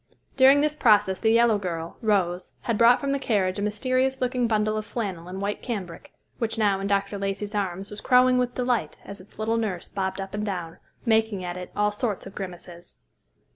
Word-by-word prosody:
During 270 +2 +6
this 300 0 +1
process 210 -8 +3
the 220 - +2
yellow 230 -2 +4
girl, 170 -3 -5
Rose, 185 -5 0
had 230 - -1
brought 235 +3 +6
from 280 -1 -2
the 280 - 0
carriage 200 -6 0
a - - -2
mysterious 255 +5 0
looking 250 -1 0
bundle 215 -1 +1
of 215 - -2
flannel 190 -8 -4
and 185 +1 -6
white 200 +1 -3
cambric, 190 -9 -6 0.3
which 225 -1 -2
now 205 -3 +2
in 195 - -2
Dr. 200 0 0
Lacey's 200 +1 -3
arms 195 -1 -3
was 210 - -8
crowing 250 0 +4
with 245 -1 -1
delight 245 -10 -1
as 200 -1 -9
its 185 - -18
little 220 +2 0
nurse 195 -6 -3
bobbed 190 0 -3
up 195 0 -6
and 210 0 -2
down, 180 -5 -4 0.3
making 220 -4 +2
at 175 0 -4
it 180 0 -7
all 210 0 +2
sorts 210 -1 -3
of 195 - -10
grimaces. 175 -2 -8
210 Hz, 205 wpm, -25 LUFS, 190-235 Hz, 0.3 s, During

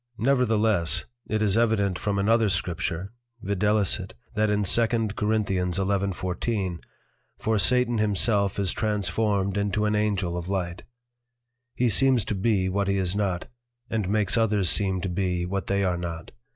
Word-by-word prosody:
Nevertheless, 110 - +2 0.2
It 110 0 0
is 100 -2 +2
evident 110 -5 +1
from 100 0 -1
another 110 +2 +3
Scripture, 90 +1 -2 0.3
viz. 100 0 +1 0.3
that 110 0 +1
in 105 0 +1
2 115 +4 +4
Cor. 110 -2 -1
11.14. 95 -1 -1 0.5
For 110 -1 0
Satan 125 +2 +3
himself 100 -1 +2
is 100 -2 +1
transformed 105 -1 -1
into 100 +1 0
an 105 - +1
Angel 100 -4 0
of 90 +1 -5
Light. 90 -2 -3 0.9
He 125 - +1
seems 125 +1 +3
to - - -2
be 100 -1 +1
what 100 +1 -1
he 100 0 +1
is 95 -1 -1
not, 95 -4 -1 0.5
and 105 -4 -1
makes 105 +1 +2
others 105 -6 +2
seem 95 -2 +1
to 95 - -3
be 90 -1 -1
what 100 +2 -3
they 100 0 +1
are 90 -2 0
not. 85 -1 -6
100 Hz, 150 wpm, -25 LUFS, 95-110 Hz, 0.9 s, 2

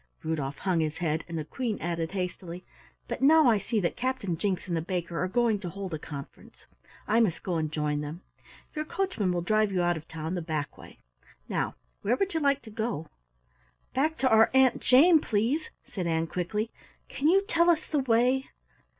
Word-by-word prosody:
Rudolf 145 -3 -2
hung 185 -3 0
his 155 -1 -1
head, 160 -2 -1
and 165 -1 -5
the 155 - -3
Queen 230 - -3
added 170 0 -3
hastily: 180 -1 -5 0.4
"But - - -4
now 310 +1 +6
I 220 -4 +4
see 220 +3 -1
that 170 - -1
Captain 250 -8 -2
Jinks 185 +2 -2
and 175 - -1
the 165 - 0
baker 175 -1 -3
are - - 0
going 230 +1 +2
to 180 -3 -5
hold 190 0 -6
a 155 - -3
conference. 140 -2 -10 0.4
I 225 - +3
must 205 -8 +1
go 180 -3 -1
and 155 -1 -1
join 150 -1 -1
them. 150 +4 -6 0.5
Your 305 - -2
coachman 320 - -1
will 175 -1 -1
drive 215 +2 +2
you 180 -2 +1
out 175 -1 +2
of 160 - -10
town 160 +1 -5
the 180 - -2
back 155 -3 -3
way. - - -14 0.5
Now - - -2 0.3
where 230 +5 +2
would 390 +7 -1
you 325 - +1
like 280 -2 +2
to 220 - -11
go?" 215 -7 -3 0.8
"Back 310 +4 +1
to 260 - +2
our 220 0 +6
Aunt 265 -1 +4
Jane, 315 +6 +6
please," 240 +9 0 0.2
said 180 -4 -4
Ann 165 0 +1
quickly. 210 +7 -2 0.4
"Can 285 - -1
you 385 +4 +5
tell 340 -2 +3
us 320 -2 +3
the 300 - 0
way?" 255 +1 +2
195 Hz, 200 wpm, -28 LUFS, 165-255 Hz, 0.8 s, now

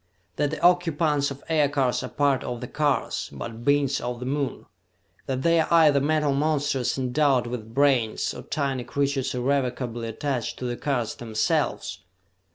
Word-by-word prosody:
"That 145 - +1
the 155 - -4
occupants 165 -5 +3
of 140 0 -9
aircars 145 -5 +1
are - - -5
part 140 -2 +1
of 120 -1 -4
the 125 - -6
cars, 145 0 -1
but 110 - -7
Beings 140 0 +2
of 120 0 -4
the 125 - -5
Moon! 140 0 -2 0.6
That 130 0 -2
they 170 0 +4
are 160 - +2
either 155 -4 +5
metal 150 0 +2
monsters 145 -3 0
endowed 130 0 +2
with 115 -2 -6
brains 135 -6 +2
or - - -8
tiny 135 -4 -2
creatures 140 -1 -1
irrevocably 125 -2 -1
attached 120 +1 -3
to 125 - -5
the 120 -1 -2
cars 125 -4 -1
themselves!" 110 -2 -1
140 Hz, 160 wpm, -25 LUFS, 125-145 Hz, 0.6 s, either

